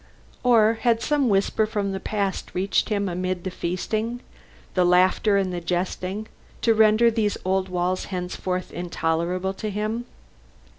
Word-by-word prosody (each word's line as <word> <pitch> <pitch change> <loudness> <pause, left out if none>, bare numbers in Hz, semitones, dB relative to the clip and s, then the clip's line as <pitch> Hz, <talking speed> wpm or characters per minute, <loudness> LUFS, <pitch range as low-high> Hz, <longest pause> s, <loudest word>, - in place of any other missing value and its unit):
Or 225 -2 +4
had 235 -2 +3
some 285 -1 +1
whisper 200 +2 +2
from 205 -2 -2
the 190 - -3
past 200 -2 -3
reached 190 +5 +1
him 200 -2 0
amid 185 0 -2
the 185 - -3
feasting, 215 +7 -2 0.5
the 180 - +3
laughing 185 +3 +4
and 190 -2 0
the 175 - -3
jesting, 185 +4 -2 0.4
to 230 - +5
render 220 +1 +5
these 220 -2 0
old 190 0 +1
walls 180 +1 -1
henceforth 180 0 -3
intolerable 175 +2 -1
to 215 +2 -4
him? 215 +4 -2
195 Hz, 145 wpm, -24 LUFS, 180-215 Hz, 0.5 s, to